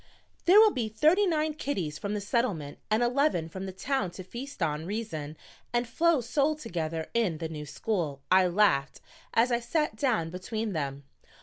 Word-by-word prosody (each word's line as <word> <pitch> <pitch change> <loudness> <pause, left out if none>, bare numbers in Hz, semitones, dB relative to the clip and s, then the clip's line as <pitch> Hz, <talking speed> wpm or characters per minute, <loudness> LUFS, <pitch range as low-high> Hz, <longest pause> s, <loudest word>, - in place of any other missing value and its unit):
"There 375 +4 +8
will 435 -1 +7
be 235 - -2
thirty 315 - +3
nine 310 -2 +1
kiddies 190 - -3
from 205 +1 -3
the 205 - -2
Settlement 200 - -1
and 220 +2 +3
eleven 250 - +2
from 190 +3 -6
the - - -4
Town 255 +1 -1
to 185 - -6
feast 240 +2 -6
on 155 +1 -1
reason 160 -8 -4 0.4
and 240 0 +1
flow 330 +3 +2
soul 280 +6 +1
together 165 - -3
in 215 -9 +1
the 165 0 -3
new 150 -2 -7
school," 150 -3 -2
I 185 0 +6
laughed, 175 -7 +2 0.4
as 235 +2 +4
I 235 - +2
sat 270 +1 -1
down 215 - 0
between 215 +4 -3
them. 140 -3 -3
215 Hz, 180 wpm, -29 LUFS, 165-255 Hz, 0.4 s, There